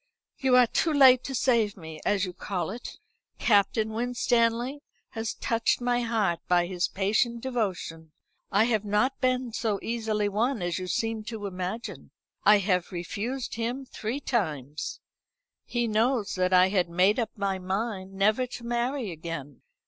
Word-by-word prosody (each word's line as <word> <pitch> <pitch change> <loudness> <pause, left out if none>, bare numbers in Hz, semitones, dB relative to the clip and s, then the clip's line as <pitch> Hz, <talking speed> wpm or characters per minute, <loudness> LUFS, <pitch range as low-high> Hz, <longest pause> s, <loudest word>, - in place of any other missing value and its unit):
"You 265 -3 +3
are 250 -1 +7
too 320 +7 0
late 260 -4 +7
to 270 - -3
save 225 -5 +2
me, 160 -3 -9
as 200 -1 +1
you 180 - -6
call 180 -1 -3
it. 235 +3 -8 0.4
Captain 215 +1 +2
Winstanley 240 +2 +1 0.3
has 225 -1 -4
touched 230 -1 +1
my 245 0 +1
heart 220 -7 0
by 175 -1 +3
his 180 0 -1
patient 220 +5 0
devotion, 190 -10 -3 0.4
I 205 +2 +4
have 220 -3 +1
not 210 +6 0
been 255 -2 0
so 220 -3 0
easily 220 -2 -1
won 220 +2 0
as 175 0 -1
you 185 - -5
seem 225 +3 -1
to 215 -2 -5
imagine. 185 +4 -5 0.3
I 210 0 +7
have 185 -3 0
refused 215 +9 -4
him 240 +4 -3
three 235 +1 -4
times. 155 - -2 0.7
He 240 -1 -1
knows 225 0 +1
that 185 0 +1
I 185 0 +6
had 185 -3 +1
made 185 +7 +3
up 230 0 -3
my 195 -1 -1
mind 190 +1 -3
never 215 +6 +2
to 245 - -8
marry 240 -1 -1
again. 160 -4 -7
215 Hz, 155 wpm, -27 LUFS, 185-240 Hz, 0.7 s, are